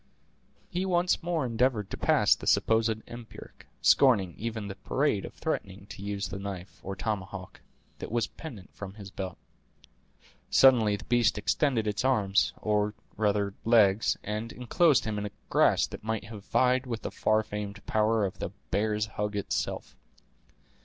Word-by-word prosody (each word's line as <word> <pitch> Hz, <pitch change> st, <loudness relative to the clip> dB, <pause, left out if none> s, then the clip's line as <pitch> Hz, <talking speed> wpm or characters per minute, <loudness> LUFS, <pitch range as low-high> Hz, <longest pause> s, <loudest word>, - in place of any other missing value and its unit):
He 180 Hz, -1 st, -2 dB
once 180 Hz, -1 st, +1 dB
more 165 Hz, -4 st, -1 dB
endeavored 115 Hz, -3 st, 0 dB
to -, -, -2 dB
pass -, -, +4 dB
the -, -, -6 dB
supposed 110 Hz, -1 st, +2 dB
empiric, 120 Hz, -1 st, -11 dB, 0.2 s
scorning 105 Hz, -10 st, +5 dB
even 110 Hz, -1 st, -4 dB
the 95 Hz, -, -5 dB
parade 105 Hz, +2 st, 0 dB
of -, -, -9 dB
threatening 95 Hz, +1 st, -4 dB
to 95 Hz, -, -9 dB
use 100 Hz, 0 st, -3 dB
the 100 Hz, -, -5 dB
knife, 100 Hz, -1 st, -7 dB
or 95 Hz, +1 st, -5 dB
tomahawk, 95 Hz, -2 st, -5 dB, 0.4 s
that -, -, -6 dB
was 115 Hz, -1 st, +1 dB
pendent 115 Hz, -, -10 dB
from 100 Hz, -1 st, -8 dB
his 100 Hz, -2 st, -10 dB
belt. 95 Hz, -3 st, -5 dB, 1.1 s
Suddenly 115 Hz, -6 st, +6 dB
the -, -, -8 dB
beast 120 Hz, -2 st, +2 dB
extended 110 Hz, +3 st, +1 dB
its 105 Hz, +1 st, -1 dB
arms, 105 Hz, -7 st, +2 dB
or 105 Hz, 0 st, +1 dB, 0.2 s
rather 100 Hz, -2 st, +1 dB
legs, 110 Hz, -3 st, +4 dB
and 105 Hz, +2 st, -4 dB
inclosed 140 Hz, +4 st, +2 dB
him 105 Hz, -2 st, -2 dB
in 105 Hz, -, -3 dB
a -, -, -10 dB, 0.2 s
grasp -, -, +3 dB
that -, -, -8 dB
might 110 Hz, -1 st, -2 dB
have 105 Hz, -2 st, -10 dB
vied 130 Hz, +1 st, +2 dB
with 115 Hz, -2 st, -4 dB
the -, -, -4 dB
far 110 Hz, 0 st, +2 dB
famed 105 Hz, 0 st, -6 dB
power 110 Hz, 0 st, +2 dB
of 95 Hz, -, -5 dB
the -, -, -3 dB, 0.2 s
"bear's 105 Hz, +1 st, +1 dB
hug" 105 Hz, -1 st, -4 dB
itself. 100 Hz, -, -3 dB
105 Hz, 160 wpm, -29 LUFS, 100-120 Hz, 1.1 s, Suddenly